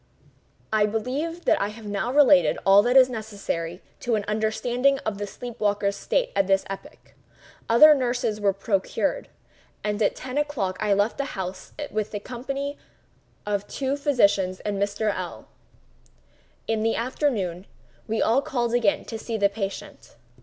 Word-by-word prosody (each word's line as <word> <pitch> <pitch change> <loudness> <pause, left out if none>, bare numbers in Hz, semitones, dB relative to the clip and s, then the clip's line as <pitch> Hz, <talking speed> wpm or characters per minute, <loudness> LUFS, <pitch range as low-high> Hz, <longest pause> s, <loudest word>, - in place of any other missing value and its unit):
I 210 -1 +4
believe 275 +11 -3
that - - +3
I 200 - +1
have 215 +1 -10
now 205 +3 -2
related 285 0 +5
all 195 +1 +7
that 245 +4 +3
is 260 -1 +8
necessary 200 -7 -5 0.2
to 240 -2 0
an 205 -2 -2
understanding 240 +5 +1
of 205 -2 -2
the 205 - -3
sleep 240 +2 -9
waker's 200 -1 +1
state - - -1
at 195 - +2
this 195 0 +2
epoch. 280 +10 -10 0.6
Other 300 +7 +8
nurses 245 -5 -1
were 200 -1 +3
procured; 195 - -1 0.5
and 210 +1 -2
at 205 - +2
ten 260 +2 -3
o'clock 265 -11 -1
I 210 -1 0
left 205 +6 0
the 280 -6 -4
house 185 0 -6
in 295 - -6 0.3
company 275 +4 -5 0.7
with 205 -1 -2
the - - -18
two 270 0 -1
physicians 200 -10 +2
and 200 -1 -3
Mr. 205 +1 0
L—l. - - -6 1.2
In 220 -1 -1
the 225 +1 +1
afternoon 220 - -1 0.4
we 225 0 0
all 240 +5 +3
called 240 -4 -2
again 230 -5 +2
to 225 - -6
see 225 0 -3
the 200 -1 +3
patient. 200 - -6
220 Hz, 160 wpm, -25 LUFS, 200-255 Hz, 1.2 s, is